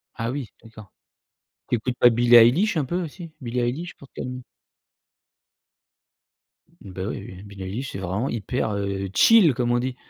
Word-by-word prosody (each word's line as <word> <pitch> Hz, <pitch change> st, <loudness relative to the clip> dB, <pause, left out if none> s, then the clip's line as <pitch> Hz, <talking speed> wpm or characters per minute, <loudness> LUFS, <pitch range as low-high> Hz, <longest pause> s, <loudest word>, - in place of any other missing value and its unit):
Ah 115 Hz, +2 st, -3 dB
oui 135 Hz, -4 st, -5 dB
d'accord. 110 Hz, -3 st, -14 dB, 0.8 s
Tu 120 Hz, -, +1 dB
écoutes 125 Hz, +2 st, -4 dB
pas 120 Hz, -, +6 dB
Billie 120 Hz, +1 st, +3 dB
Eilish 145 Hz, -, +5 dB
un 150 Hz, -, +1 dB
peu 175 Hz, +7 st, -2 dB
aussi? 165 Hz, 0 st, -9 dB
Billie 125 Hz, 0 st, -3 dB
Eilish 145 Hz, +9 st, -3 dB
pour 140 Hz, -, -15 dB
te -, -, -63 dB
calmer. 125 Hz, 0 st, -6 dB, 2.4 s
Bah 95 Hz, -1 st, -7 dB
oui, 100 Hz, -, -5 dB
oui, 95 Hz, +2 st, -11 dB
Billie 100 Hz, -2 st, -10 dB
Eilish 115 Hz, +9 st, -5 dB
c'est 95 Hz, -, -6 dB
vraiment 95 Hz, +8 st, -2 dB
hyper, 115 Hz, +1 st, -2 dB
heu, 100 Hz, -1 st, -3 dB
chill 205 Hz, -, +6 dB
comme 120 Hz, 0 st, -1 dB
on 120 Hz, -, +2 dB
dit. 130 Hz, 0 st, -3 dB
120 Hz, 170 wpm, -23 LUFS, 105-135 Hz, 2.4 s, pas